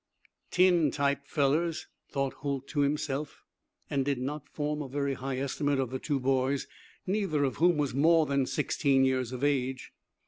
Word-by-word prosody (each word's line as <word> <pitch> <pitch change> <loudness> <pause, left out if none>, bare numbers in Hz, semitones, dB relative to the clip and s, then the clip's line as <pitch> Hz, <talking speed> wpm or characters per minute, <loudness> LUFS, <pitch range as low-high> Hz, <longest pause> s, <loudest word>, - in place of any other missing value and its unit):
"Tin 180 -4 +4
type 140 0 -1
fellers," 155 +4 +1 0.2
thought 135 -1 -1
Holt 140 -2 -4
to 150 - -2
himself, 145 0 -1 0.4
and 135 -1 0
did 140 0 0
not 140 +4 -5
form 150 0 -2
a 145 - -5
very 140 +1 -1
high 135 0 -4
estimate 140 +1 0
of 130 -2 -1
the 130 - -3
two 145 -1 -1
boys, 135 +1 +1 0.4
neither 190 -7 0
of 135 - -1
whom 175 0 +4
was 145 -4 0
more 160 +4 +4
than 140 -2 0
sixteen 140 -2 +2
years 130 -2 0
of 130 +1 -5
age. 130 -2 -1
140 Hz, 170 wpm, -29 LUFS, 135-150 Hz, 0.4 s, Tin